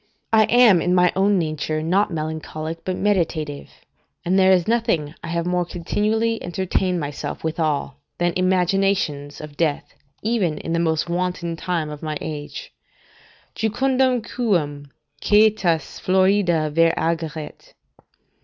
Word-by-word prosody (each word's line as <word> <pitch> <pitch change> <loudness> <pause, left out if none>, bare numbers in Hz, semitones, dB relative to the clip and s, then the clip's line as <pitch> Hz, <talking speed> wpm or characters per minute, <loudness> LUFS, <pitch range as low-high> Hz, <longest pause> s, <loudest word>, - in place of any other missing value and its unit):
I 220 -1 +6
am 230 -7 +5
in 180 +2 +1
my 180 -1 +4
own 195 +1 +3
nature 155 -1 -2
not 190 +6 +2
melancholic, 160 0 -5
but 185 - -2
meditative; 160 -7 -1 0.6
and 185 +3 +2
there 190 0 +5
is 180 -3 +3
nothing 220 -11 0
I - - -6
have 170 0 -2
more 180 0 +1
continually 215 +6 -1
entertained 180 0 -1
myself 145 -2 -5
withal 155 -3 -1 0.2
than 175 0 0
imaginations 185 -5 0
of 150 -1 -10
death, 155 -4 -1 0.3
even 205 -9 0
in 165 - -4
the 170 - +1
most 160 -1 0
wanton 175 -1 -2
time 165 -3 -2
of 150 - -8
my 155 -1 -3
age: 155 - -7 0.8
"Jucundum 255 +2 +1
quum 160 -13 -1 0.3
aetas 205 -8 +2
florida 185 -4 +2
ver 165 +1 +4
ageret." 160 -2 -4
175 Hz, 130 wpm, -22 LUFS, 155-195 Hz, 0.8 s, I